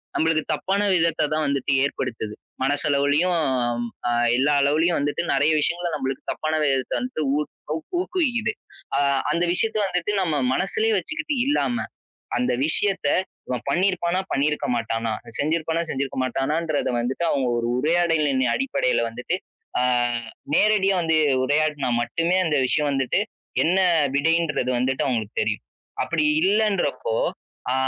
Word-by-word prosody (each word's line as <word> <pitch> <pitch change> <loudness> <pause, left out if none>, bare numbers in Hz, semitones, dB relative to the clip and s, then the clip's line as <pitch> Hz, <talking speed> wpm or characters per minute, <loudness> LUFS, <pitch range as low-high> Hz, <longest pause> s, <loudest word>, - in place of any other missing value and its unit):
நம்மளுக்கு 160 -1 +2
தப்பான 195 +2 0
விதத்த 165 -3 +2
தான் 155 0 0
வந்துட்டு 140 0 -1
ஏற்படுத்துது, 115 -6 -3 0.3
மனசளவுலயும், 145 +4 +2 0.7
அ - - +1 0.3
எல்லா 145 +3 +3
அளவுலயும் 160 +5 +2
வந்துட்டு 145 +3 -1
நறைய 145 +3 +3
விஷயங்கள 170 +3 -1
நம்மளுக்கு 135 -2 -3
தப்பான 155 0 -3
விதத்த 135 -3 0
வந்துட்டு 250 -12 -3
ஊ - - +1 0.6
ஊக்குவிக்குது. 245 - 0 0.5
அ - - +3 0.3
அந்த 170 +2 +1
விஷயத்த 220 +3 0
வந்துட்டு 180 +2 -1
நம்ம 160 -5 0 0.2
மனசுலயே 215 +6 0
வச்சுக்கிட்டு 300 - -3
இல்லாம. 250 -4 0 0.5
அந்த 250 - +1
விஷயத்த 190 -2 +1 0.4
இவன் 125 -1 -3
பண்ணிருப்பானா, 180 +1 +1
பண்ணிருக்க 150 +2 0
மாட்டானா, 115 -1 -1 0.3
செஞ்சிருப்பானா, 160 +2 0
செஞ்சிருக்க 135 -1 -3
மாட்டானான்றத 150 +5 -1
வந்துட்டு, 130 +8 -2
அவங்க 135 -3 +1
ஒரு 115 0 -1
உரையாடலின் 155 -3 +2
அடிப்படைல 260 - +1
வந்துட்டு. 125 +10 -3 0.4
ஆ - - +2 0.7
நேரடியா 205 -2 +3
வந்து 160 -1 +2 0.3
உரையாடுனா 145 -1 +1
மட்டுமே 165 +9 0
அந்த 150 -4 +1
விஷயம் 150 +1 +1
வந்துட்டு, 135 +7 +1 0.4
என்ன 180 +4 +2 0.4
விடைன்றது 160 -3 +1
வந்துட்டு 130 +1 0
அவங்களுக்கு 115 -5 -2
தெரியும். - - -2 0.4
அப்படி 165 -2 0 0.2
இல்லன்றப்போ. 210 - +1 0.6
ஆ - - +1
155 Hz, 125 wpm, -23 LUFS, 140-180 Hz, 0.7 s, எல்லா